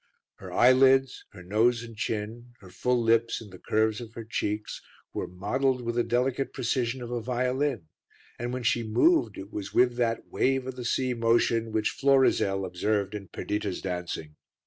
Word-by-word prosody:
Her - - -10
eyelids, 130 +1 +4
her 95 -3 -13
nose 115 +5 +2
and 115 -1 -10
chin, 115 +2 -4
her 95 -2 -14
full 125 +7 0
lips 115 0 +2
and 105 -3 -12
the 90 - -12
curves 110 +1 0
of 115 -1 -10
her 115 - -6
cheeks 105 -1 -3 0.3
were - - -3
modelled 125 +8 -1
with 120 0 -2
the 120 0 +1
delicate 125 +3 0
precision 125 0 -1
of 120 - -7
a 120 -1 -2
violin, 125 - -1 0.5
and 120 +1 -3
when 125 0 -4
she 115 0 +2
moved 320 - +2
it 100 +2 -9
was 100 -2 -6
with 125 -1 +4
that 115 -2 0
wave 135 -1 0
o' 130 - -3
the 125 -1 -8
sea 130 +1 0
motion 115 -1 +2
which 110 0 0
Florizel 130 -8 +2
observed 100 +2 -1
in 100 -2 -6
Perdita's 105 +1 -3
dancing. 90 -4 -5
115 Hz, 175 wpm, -27 LUFS, 105-125 Hz, 0.5 s, eyelids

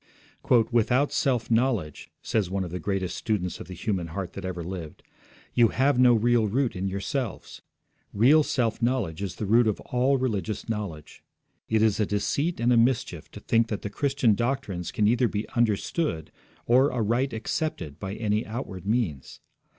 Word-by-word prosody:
'Without 120 +4 +2
self 125 -4 0
knowledge,' 115 - 0
says 105 -5 0
one 95 0 -1
of 90 - -6
the 90 - -4
greatest 95 -3 -2
students 100 -5 -2
of - - -9
the 90 - -8
human 90 -1 -2
heart 90 +2 -5
that 95 - -7
ever 90 -2 -4
lived, 85 -3 -7 0.5
'you 120 -1 +5
have 130 +3 +1
no 125 -1 +6
real 115 0 +3
root 125 +4 0
in 95 +1 -2
yourselves. 100 +5 -4 0.5
Real 135 +9 +5
self 120 -6 -1
knowledge 115 -9 0
is 95 -3 -4
the 105 - -4
root 115 +3 +4
of 105 - 0
all 125 +2 +1
real 130 -1 0
religious 105 0 -4
knowledge. 100 -9 -5 0.5
It 110 -1 +3
is 110 -2 +2
a 105 - +1
deceit 140 - -1
and 120 +1 +3
a - - +4
mischief 115 - +1
to - - -10
think 115 +2 +2
that 105 -2 -4
the 105 - -4
Christian 135 -2 +2
doctrines 115 -6 -2
can 105 - +1
either 120 +2 +3
be 105 -1 -3
understood 110 - -1 0.3
or 130 +4 +4
aright 120 +3 0
accepted 110 - -3
by 95 0 -5
any 110 0 0
outward 105 -5 -6
means. 105 - -2
110 Hz, 175 wpm, -26 LUFS, 95-125 Hz, 0.5 s, no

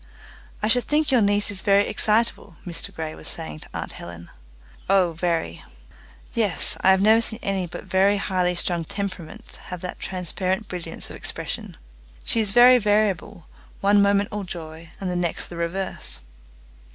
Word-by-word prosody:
"I - - +3
should 245 +2 +3
think 300 -1 +2
your 250 -3 +5
niece 205 0 +3
is 190 -2 0
very 200 0 +4
excitable," 215 -3 +1
Mr 175 +2 -5
Grey 160 -3 -5
was 80 - -10
saying 75 -1 -5
to - - -11
aunt - - -5
Helen. 85 0 -10 0.6
"Oh, 190 -3 +4
very." 165 - -2 0.7
"Yes; 215 -6 +2
I - - +5
have 190 +1 +5
never 220 +2 +6
seen 220 -1 -1
any 195 -3 -1
but 175 - -8
very 190 +2 +3
highly 180 -2 0
strung 175 -1 -1
temperaments 185 -2 -6
have 180 -2 -8
that 180 - -5
transparent 185 +2 -2
brilliance 170 -2 -6
of - - -8
expression." - - -5 0.5
"She 230 - +2
is 215 -2 +1
very 245 +4 +7
variable 205 -4 0 0.3
one 200 +1 +4
moment 200 0 +3
all 210 -1 -3
joy, 165 -2 -8
and 195 - -3
the 180 - -1
next 175 -2 -2
the 175 - -8
reverse." 170 - -3
190 Hz, 165 wpm, -24 LUFS, 170-205 Hz, 0.7 s, very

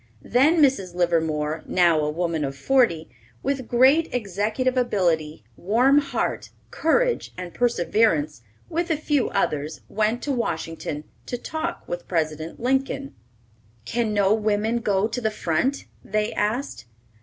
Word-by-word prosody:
Then 300 +6 +4
Mrs. 195 -11 +1
Livermore, 160 -3 0
now 170 -3 +3
a 150 0 0
woman 165 0 -1
of 135 -1 -4
forty, 225 - +2 0.4
with 265 -3 -2
great 270 +7 +4
executive 220 +3 -1
ability, 170 - 0
warm 245 - +3
heart, 285 - -2 0.2
courage, 485 +10 +1
and 180 -1 -7
perseverance, 175 - +1 0.3
with 340 +2 -2
a 320 - +1
few 295 -4 0
others, 150 -5 -1
went 215 +3 0
to 290 - -1
Washington 165 - -3 0.2
to 245 - -3
talk 320 +6 -5
with 175 0 -5
President 155 -1 -2
Lincoln. 270 +2 -1 0.7
"Can 230 - -1
no 205 -1 +3
women 215 +1 +1
go 205 -2 +1
to 245 +2 -4
the 220 - +1
front?" 215 - -1 0.2
they 215 +1 -1
asked. 215 - -2
215 Hz, 130 wpm, -24 LUFS, 165-260 Hz, 0.7 s, Then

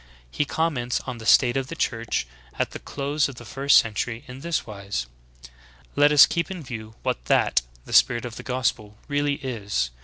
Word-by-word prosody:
He 145 - 0
comments 140 -6 -1
on 125 -3 -7
the 110 - -7
state 120 -2 +5
of 135 -1 -1
the 165 - -6
Church 115 - -1 0.3
at - - -1
the - - -7
close 140 +1 -1
of 135 - -9
the 120 - -11
first 140 +5 +4
century 115 +1 0
in 125 +1 -9
this 170 +2 -1
v»'ise: 100 - -5 0.9
"Let 145 +1 +5
us 150 -1 +9
keep 170 -1 -1
I - - -4
in 170 - -8
view 110 -4 -8
what - - -2
that - - +3 0.2
[the - - -8
spirit 120 -1 +4
of 120 -2 -6
the - - -7
gospel] 110 -5 -2
really 145 0 0
is. 105 - -2
125 Hz, 195 wpm, -24 LUFS, 110-145 Hz, 0.9 s, us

